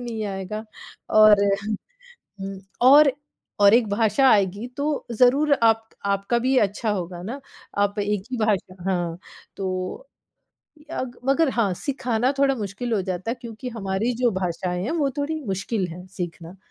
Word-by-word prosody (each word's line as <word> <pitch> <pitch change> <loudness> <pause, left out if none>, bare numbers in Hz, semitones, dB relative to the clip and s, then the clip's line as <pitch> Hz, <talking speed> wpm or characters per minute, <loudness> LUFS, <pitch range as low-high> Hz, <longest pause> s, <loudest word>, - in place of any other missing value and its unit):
नहीं 235 -3 -4
आएगा 195 +2 -5 0.6
और 210 -1 +7 1.0
हुँ। 195 0 -5 0.2
और 280 +3 +8 0.5
और 200 +1 +7
एक 235 -2 +3
भाषा 220 +5 +3
आएगी 200 +2 +2
तो 290 0 -1
ज़रूर 265 +6 +4
आप 225 0 +3 0.2
आपका 200 +4 +1
भी 260 +2 +2
अच्छा 210 +1 +1
होगा 175 -2 -4
ना, 260 +7 -6 0.4
आप 205 +1 +1
एक 205 -1 -1
ही 250 - -2
भाषा 190 -3 -2
हाँ, 175 -2 -2 0.4
तो 185 - -4 0.8
यग 250 -4 -4
मगर 290 +1 +3
हाँ, 215 -7 +1
सिखाना 250 +1 -1
थोड़ा 275 -1 +3
मुश्किल 215 +2 -4
हो 205 - +1
जाता 185 +3 -3
है 245 - -2
क्योंकि 235 +2 -7
हमारी 195 +4 -1
जो 240 - +4
भाषाएँ 180 0 -2
हैं 240 - -2
वो 300 -5 +1
थोड़ी 310 +2 -2
मुश्किल 195 +1 -2
हैं 180 +2 -10
सीखना, 175 -1 -7
215 Hz, 150 wpm, -24 LUFS, 190-250 Hz, 1.0 s, और